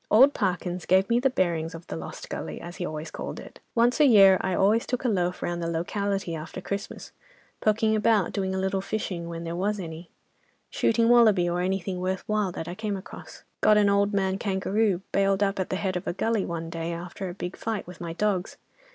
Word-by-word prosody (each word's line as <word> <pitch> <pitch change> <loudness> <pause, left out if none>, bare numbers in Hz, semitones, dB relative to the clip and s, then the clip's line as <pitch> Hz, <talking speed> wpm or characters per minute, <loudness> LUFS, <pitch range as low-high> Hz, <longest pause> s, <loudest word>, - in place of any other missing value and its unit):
Old 265 +7 +7
Parkins 180 -3 -2
gave 190 +1 +4
me 235 - +4
the 270 +2 +3
bearings 170 -7 -1
of 165 +1 -10
the - - -6
'Lost 80 - -7
Gully,' - - -5
as 175 +1 -9
he 175 - -3
always 155 +1 -6
called - - -6
it. - - -12 0.2
Once 240 +4 +3
a 300 - +7
year, 195 -5 +7
I 185 - -1
always 210 +5 +3
took 250 +1 -2
a - - +4
loaf 180 -5 0
round 175 0 -2
the 165 - -2
locality 195 +2 -2
after 160 +3 -6
Christmas, 200 +2 -5 0.5
poking 220 0 +2
about 215 -3 +2
doing 190 -1 -1
a - - -1
little 190 0 0
fishing, 190 -4 -4
when 165 0 -5
there 170 0 -4
was 205 +3 -1
any: 165 -1 -7 0.6
shooting 230 0 +2
wallaby 220 -7 +5
or 175 +1 0
anything 185 0 -2
worth 185 +1 -2
while 210 -3 0
that 165 - -6
I 175 - -4
came 210 0 -3
across. 190 - -11 0.2
Got 215 0 +5
an 205 -1 +4
old 200 0 +3
man 195 -1 0
kangaroo 195 -1 0
bailed 195 0 +2
up 195 -1 0
at 185 - -2
the - - -1
head 185 -1 -2
of 180 - -4
a - - 0
gully, 220 +2 0
one 165 -1 -4
day 165 0 -3
after 175 +3 -6
a 175 - -7
big 180 -1 -5
fight 220 -3 -3
with 180 0 -11
my 170 -1 -4
dogs. 195 0 -1
190 Hz, 220 wpm, -26 LUFS, 175-210 Hz, 0.6 s, Old